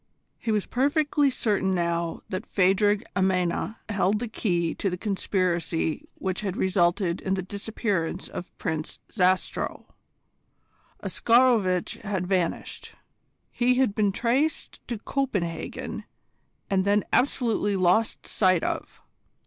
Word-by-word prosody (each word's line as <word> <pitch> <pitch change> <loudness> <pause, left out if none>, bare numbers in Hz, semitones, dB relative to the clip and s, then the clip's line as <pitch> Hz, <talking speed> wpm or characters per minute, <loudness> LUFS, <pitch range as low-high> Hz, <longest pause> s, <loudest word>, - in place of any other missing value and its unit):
He 225 - -2
was 210 -2 +1
perfectly 290 +2 +2
certain 200 -6 +1
now 170 -1 -1
that 190 +4 -4
Phadrig 195 +2 +3
Amena 185 +2 +1
held 205 -1 +1
the 240 +3 -3
key 175 -7 0
to 195 - -1
the 180 - -3
conspiracy 180 -5 -1
which 190 0 -3
had 195 -3 -3
resulted 180 -1 +1
in 190 0 0
the 190 - -3
disappearance 200 -3 -2
of 180 - -7
Prince 160 -4 -3
Zastrow. 185 -2 0 1.2
Oscarovitch 230 -7 +3
had 195 -4 -2
vanished. 180 -2 -2 0.6
He 250 +1 +2
had 255 -5 +2
been 205 -2 +2
traced 255 +9 0
to 235 - -3
Copenhagen, 205 -10 -3 0.6
and 190 -1 +2
then 205 +1 +3
absolutely 230 -6 +2
lost 185 +4 +2
sight 185 -4 +2
of. - - -4
195 Hz, 115 wpm, -26 LUFS, 180-220 Hz, 1.2 s, Phadrig